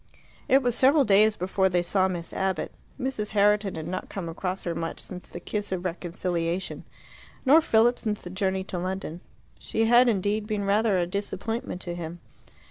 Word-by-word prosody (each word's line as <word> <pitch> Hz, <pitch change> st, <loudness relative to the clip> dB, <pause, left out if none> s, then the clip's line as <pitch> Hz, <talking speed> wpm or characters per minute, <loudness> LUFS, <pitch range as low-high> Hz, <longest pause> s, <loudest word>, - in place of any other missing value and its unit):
It 270 Hz, +1 st, +5 dB
was 245 Hz, -1 st, +2 dB
several 275 Hz, +5 st, +5 dB
days 210 Hz, +1 st, +5 dB
before 190 Hz, +1 st, +1 dB
they 175 Hz, -1 st, +1 dB
saw 190 Hz, +2 st, +2 dB
Miss 175 Hz, -2 st, -4 dB
Abbott. 190 Hz, -4 st, -1 dB, 0.3 s
Mrs. 250 Hz, -6 st, -2 dB
Herriton 205 Hz, -1 st, +3 dB
had 160 Hz, -1 st, -5 dB
not 185 Hz, +1 st, -4 dB
come 190 Hz, -4 st, -5 dB
across 180 Hz, +3 st, -3 dB
her 170 Hz, -, -2 dB
much 165 Hz, 0 st, -4 dB
since 180 Hz, -1 st, -7 dB
the -, -, -7 dB
kiss 205 Hz, +3 st, -3 dB
of 185 Hz, -1 st, -3 dB
reconciliation, 175 Hz, 0 st, -2 dB, 0.6 s
nor 295 Hz, +5 st, +7 dB
Philip 235 Hz, -3 st, +3 dB
since 210 Hz, -2 st, -3 dB
the 175 Hz, -, -7 dB
journey 190 Hz, 0 st, -1 dB
to 185 Hz, -2 st, -5 dB
London. 180 Hz, -2 st, -4 dB, 0.4 s
She 225 Hz, -, 0 dB
had, 240 Hz, +2 st, +6 dB
indeed, 205 Hz, 0 st, 0 dB
been 210 Hz, -2 st, -2 dB
rather 205 Hz, 0 st, +3 dB
a 175 Hz, -, +1 dB
disappointment 200 Hz, +2 st, -4 dB
to 175 Hz, -, -5 dB
him. 175 Hz, 0 st, -6 dB
190 Hz, 180 wpm, -26 LUFS, 180-215 Hz, 0.6 s, nor